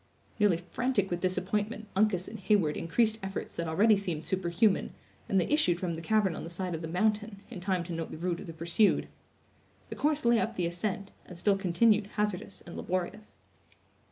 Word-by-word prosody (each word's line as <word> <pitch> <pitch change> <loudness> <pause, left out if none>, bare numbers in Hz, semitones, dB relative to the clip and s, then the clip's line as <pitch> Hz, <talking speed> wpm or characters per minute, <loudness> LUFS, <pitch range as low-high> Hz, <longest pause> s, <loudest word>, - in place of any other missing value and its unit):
Nearly 205 -5 +4
frantic 200 +3 -1
with 175 - -1
disappointment, 205 +4 -1
Uncas 195 -3 +2
and 220 - -7
Heyward 190 -6 +2
increased 220 +6 +1
efforts 195 0 -5
that 170 - -2
already 210 +7 +5
seemed 175 -6 -3
superhuman, 190 +2 +1 0.4
and 195 - +3
they 175 - +2
issued 235 - +2
from 180 -2 -2
the 160 - -5
cavern 200 -1 +2
on - - -6
the 165 - -6
side 180 +1 -3
of 160 - -4
the 160 - -4
mountain, 210 +3 0
in - - -6
time 185 -1 0
to 170 0 -6
note 165 -1 -3
the - - -7
route 175 +1 -2
of - - -9
the 165 - -6
pursued. 170 +6 +2 0.8
The - - -5
course 300 -2 +1
lay 235 -1 +5
up 230 +1 -1
the 180 - 0
ascent, 195 +3 -3 0.2
and 180 - -10
still 200 +3 +3
continued 200 +3 +3
hazardous 210 -3 -2
and 170 - -9
laborious. 185 +4 -3
190 Hz, 195 wpm, -30 LUFS, 170-215 Hz, 0.8 s, already